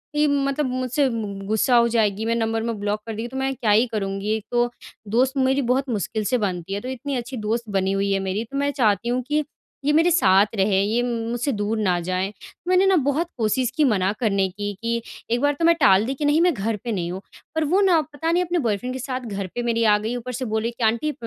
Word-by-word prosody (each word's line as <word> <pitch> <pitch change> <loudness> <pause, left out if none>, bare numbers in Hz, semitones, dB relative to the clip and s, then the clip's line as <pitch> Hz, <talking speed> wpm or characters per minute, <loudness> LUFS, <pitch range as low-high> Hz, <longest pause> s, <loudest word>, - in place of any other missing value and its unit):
कि 300 0 +3
मतलब 280 0 0
मुझसे 255 +2 0
मु 225 -3 -3
मु 195 0 -7
गुस्सा 220 +4 +2
हो 235 0 +5
जाएगी, 220 -2 +1
मेरा 230 +1 0
नंबर-वंबर 225 +1 -1
में 215 - -8
ब्लॉक 205 +1 -1
कर 225 - -4
देगी 225 +2 -4
तो 260 +2 -7
मैं 270 0 0
क्या 220 -3 0
ही 225 +4 +4
करूँगी? 200 0 -2
एक 220 - -6
तो 240 0 +2 0.5
दोस्त 260 +2 +2
मेरी 265 +1 +2
बहुत 270 +1 -1
मुश्किल 220 -1 -2
से - - +5
बनती 185 -3 -3
है 200 - -3
तो 255 - -6
इतनी 260 +2 -4
अच्छी 245 +1 -4
दोस्त 230 0 -1
बनी 190 0 +1
हुई 195 0 0
है 195 - +1
मेरी 205 +4 -1
तो 275 - -3
मैं 285 0 +1
चाहती 215 +1 +2
हूँ 250 +1 0
कि 300 +1 +1 0.4
ये 295 - +3
मेरे 330 +3 +4
साथ 195 - +5
रहे, 195 0 +2
ये 220 +4 +1
मु 230 -2 -2
मुझसे 245 +4 -1
दूर 210 -1 -1
ना 185 -5 +1
जाए। 185 +3 -2 0.4
मैंने 370 +1 +4
ना 385 - +4
बहुत 300 +4 +1
कोशिश 235 +3 +1
की 310 - +4
मना 200 -7 +2
करने 200 -5 +1
की, 205 +2 -5
कि 235 0 -1 0.3
एक 240 +2 +1
बार 290 0 +3
तो 330 - +2
मैं 335 0 +6
टाल 210 - +4
दी 265 - -2
कि 295 - -3
नहीं 295 +3 +3
मैं 355 -1 +4
घर 220 -1 -2
पे 235 - -3
नहीं 175 -4 -2
हूँ। 190 - -6 0.3
पर 320 - +1
वो 385 - +4
ना 360 -4 +4
पता 310 +2 -3
नहीं 355 +1 +2
अपने 345 0 -1
बॉयफ्रेंड 230 +4 -1
के 260 - -4
साथ 255 0 -3
घर 200 -5 -5
पे 240 - -1
मेरी 230 -1 +1
आ 210 -2 +5
गई, 220 +3 -3
ऊपर 245 +1 -5
से 255 +2 -3
बोले 220 0 -1
कि 235 - -6
आंटी 235 +7 +1
अ, - - -10
235 Hz, 260 wpm, -23 LUFS, 205-270 Hz, 0.5 s, मैं